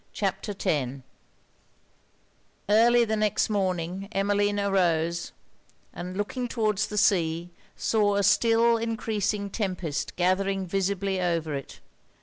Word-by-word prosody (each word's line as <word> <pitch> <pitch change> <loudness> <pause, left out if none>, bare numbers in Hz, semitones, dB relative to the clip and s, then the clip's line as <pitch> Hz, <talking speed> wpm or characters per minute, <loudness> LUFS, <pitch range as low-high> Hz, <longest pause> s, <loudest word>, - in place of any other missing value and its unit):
CHAPTER 205 - -2
X 135 -2 -1 1.6
Early 235 +3 +5
the 220 0 -1
next 215 0 +1
morning, 190 -1 -2
Emmeline 205 0 +1
arose; 170 -4 +1 0.6
and 180 +1 -6
looking 245 +5 -2
towards 215 -3 0
the 210 - -6
sea, 170 -4 +2 0.2
saw 205 -2 +1
a 200 - +1
still 230 +3 +4
encreasing 215 -3 -2
tempest 185 -8 -3
gathering 190 +2 +1
visibly 195 +1 -1
over 165 -3 -1
it. 140 -1 -7
195 Hz, 110 wpm, -26 LUFS, 175-210 Hz, 1.6 s, Early